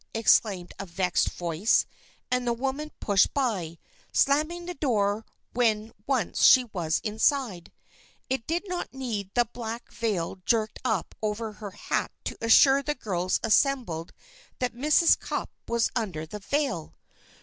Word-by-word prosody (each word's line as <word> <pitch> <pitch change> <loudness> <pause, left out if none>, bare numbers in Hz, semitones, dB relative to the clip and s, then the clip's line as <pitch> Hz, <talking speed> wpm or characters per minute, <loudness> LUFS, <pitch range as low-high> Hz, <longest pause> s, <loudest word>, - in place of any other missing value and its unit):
exclaimed 200 -5 +3
a 195 - -4
vexed 180 0 +1
voice 175 +5 +1 0.5
and 250 -1 0
the 235 - +2
woman 270 +5 -3
pushed 200 -2 +3
by, 195 - -1 0.3
slamming 310 +5 +2
the 355 - -4
door 215 -8 0 0.3
when 225 -2 +1
once 255 -9 0
she 255 - +8
was 165 -4 0
inside. 220 - 0 0.6
It 260 -3 -2
did 345 +5 -1
not 355 -6 -4
need 225 -7 -3
the 240 -1 +4
black 230 0 -6
veil 195 -6 -2
jerked 220 0 0
up 220 -8 -1
over 215 +1 -2
her 210 0 -8
hat 205 - -2
to - - -5
assure 270 +4 +6
the 295 +2 -2
girls 185 -7 -1
assembled 225 - +1 0.5
that 250 -2 -1
Mrs. 300 +7 +4
Cupp - - -4 0.2
was 235 -1 +1
under 190 -10 -2
the 210 +6 -8
veil! 260 - -2
225 Hz, 140 wpm, -27 LUFS, 200-265 Hz, 0.6 s, she